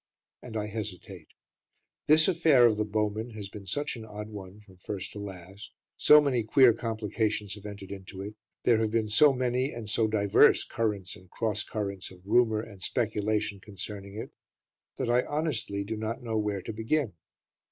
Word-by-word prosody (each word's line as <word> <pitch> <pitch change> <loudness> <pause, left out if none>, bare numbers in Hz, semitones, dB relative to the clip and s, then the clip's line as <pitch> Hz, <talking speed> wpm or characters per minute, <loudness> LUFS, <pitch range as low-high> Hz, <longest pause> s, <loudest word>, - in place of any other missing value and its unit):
And 115 -3 -6
I 105 - -1
hesitate. 100 -5 -7 0.8
This 155 +1 +7
affair 160 -8 +5
of 110 -3 +4
"The 105 - 0
Bowmen" 110 +2 -2
has 100 -3 -6
been 100 -1 -10
such 145 +9 -2
an 115 - -8
odd 105 0 -8
one 100 -1 -10
from 95 -3 -19
first 95 +1 -5
to 105 - -8
last, 95 0 -9 0.2
so 150 - +7
many 140 -5 +1
queer 120 +2 +6
complications 110 -2 -2
have 105 0 -9
entered 100 -2 -9
into 95 0 -8
it, 105 +2 -7 0.3
there 115 -2 +4
have 110 -1 +1
been 110 -1 0
so 140 +8 +6
many 130 +1 0
and 115 -2 -7
so 110 +1 +1
divers 100 -2 +4
currents 105 -5 -2
and 90 0 -17
cross 105 -1 -1
currents 100 -3 -4
of 90 0 -16
rumour 110 0 +3
and 100 -4 -12
speculation 105 +2 -1
concerning 100 0 -8
it, 110 - -7 0.6
that 130 - -2
I 120 +1 +4
honestly 135 -10 -2
do 110 +3 -4
not 110 +3 -4
know 115 -2 -3
where 105 -3 -1
to 115 - -5
begin. 115 - 0
105 Hz, 180 wpm, -29 LUFS, 100-115 Hz, 0.8 s, This